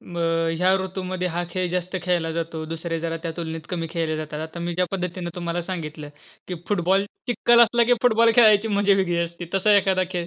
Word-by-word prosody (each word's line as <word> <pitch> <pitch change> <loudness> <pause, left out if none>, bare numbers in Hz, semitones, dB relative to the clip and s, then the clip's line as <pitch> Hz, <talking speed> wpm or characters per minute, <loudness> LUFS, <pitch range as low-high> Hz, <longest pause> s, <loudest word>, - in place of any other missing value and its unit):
अ, 175 - -9 0.4
ह्या 180 +2 +2
ऋतूमध्ये 185 -1 -3
हा 175 +1 -2
खेळ 185 +1 -1
जास्त 180 +1 -2
खेळला 175 -2 0
जातो. 165 -1 -4
दुसरे 165 +1 -4
जरा 165 0 -3
त्या 165 - -3
तुलनेत 165 -1 -5
कमी 170 -3 -3
खेळले 160 -2 -2
जातात. 155 -1 -5
आता 160 +2 -7
मी 170 0 -3
ज्या 180 +1 +1
पद्धतीने 180 -2 -4
तुम्हाला 175 0 -3
सांगितलं 155 -4 -6 0.4
की 180 - -3
फुटबॉल, 195 0 +2 0.2
चिखल 240 0 +4
असला 235 0 +5
की 245 - +4
फुटबॉल 230 -1 +4
खेळायची 220 -2 +6
मजा 205 -1 +2
वेगळी 180 -3 0
असते. 170 0 -7
तसा 205 +2 +4
एखादा 190 -1 +2
खेळ? 175 -2 -3
180 Hz, 200 wpm, -23 LUFS, 165-195 Hz, 0.4 s, खेळायची